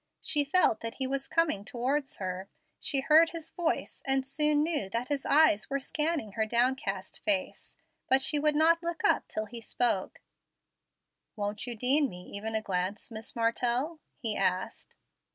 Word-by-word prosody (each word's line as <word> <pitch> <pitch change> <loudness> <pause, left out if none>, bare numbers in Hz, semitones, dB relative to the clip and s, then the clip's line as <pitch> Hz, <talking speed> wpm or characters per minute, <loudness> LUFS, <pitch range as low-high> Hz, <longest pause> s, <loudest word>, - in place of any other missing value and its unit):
She 295 -2 +1
felt 285 -6 +3
that 230 0 -6
he 265 - -1
was 270 +1 -2
coming 325 -12 +1
towards 265 +5 -2
her, 185 0 -5 0.3
she 275 -2 +2
heard 315 +4 +6
his 330 -1 -7
voice, 340 -2 -2
and 270 -1 +1
soon 300 +2 +2
knew 305 - -1
that 235 +6 -3
his 285 -2 -2
eyes 285 -8 +4
were 275 0 -1
scanning 300 -4 -2
her 220 +2 -1
downcast 235 -5 -1
face, 285 -3 -2 0.3
but 265 0 +4
she 295 +2 +3
would 300 0 +2
not 330 +2 +4
look 340 +5 -4
up 410 - +2
till 215 - -3
he 230 +2 -8
spoke. 225 -4 -1 1.2
"Won't 205 +1 -3
you 240 - -4
deign 265 +5 +3
me 180 -2 -10
even 220 +2 -4
a 220 - 0
glance, 190 +4 -3
Miss 220 0 -5
Martell?" 240 +7 0 0.2
he 220 -3 0
asked. 185 -1 -2
260 Hz, 170 wpm, -29 LUFS, 215-300 Hz, 1.2 s, heard